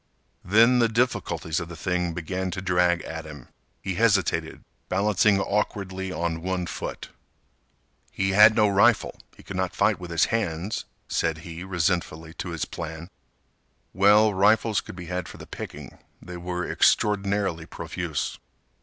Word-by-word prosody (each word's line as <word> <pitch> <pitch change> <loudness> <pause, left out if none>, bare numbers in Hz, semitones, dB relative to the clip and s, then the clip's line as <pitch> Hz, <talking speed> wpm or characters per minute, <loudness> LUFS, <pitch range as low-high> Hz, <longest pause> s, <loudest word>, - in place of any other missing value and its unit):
Then 115 +6 +5
the 115 - +4
difficulties 115 -8 0
of 85 -1 -6
the 85 - -8
thing 90 +1 -1
began 90 +2 -3
to 90 - -4
drag 90 -2 +2
at 80 0 -6
him. 75 -5 -11 0.3
He 95 - -2
hesitated, 100 -3 +1 0.3
balancing 100 +1 +3
awkwardly 95 -2 -2
on 85 -2 -2
one 90 0 -2
foot. - - -6 1.0
He 95 0 0
had 105 +3 +7
no 110 -2 +4
rifle; 100 0 +3 0.2
he - - -15
could 100 - -7
not 95 -1 -2
fight 100 0 +2
with 90 -1 -8
his 85 0 +3
hands, 100 -1 -2 0.2
said 80 -1 -1
he 85 0 -7
resentfully 85 -3 -1
to - - -4
his 80 -3 -3
plan. 80 +1 -7 0.8
Well, 105 +3 +5
rifles 105 +2 +3
could - - -10
be 90 -1 -8
had 90 0 -4
for - - -11
the - - -10
picking. - - -9 0.2
They 90 0 -9
were 90 0 -3
extraordinarily 100 -5 +1
profuse. 85 -3 -4
90 Hz, 150 wpm, -25 LUFS, 85-100 Hz, 1.0 s, had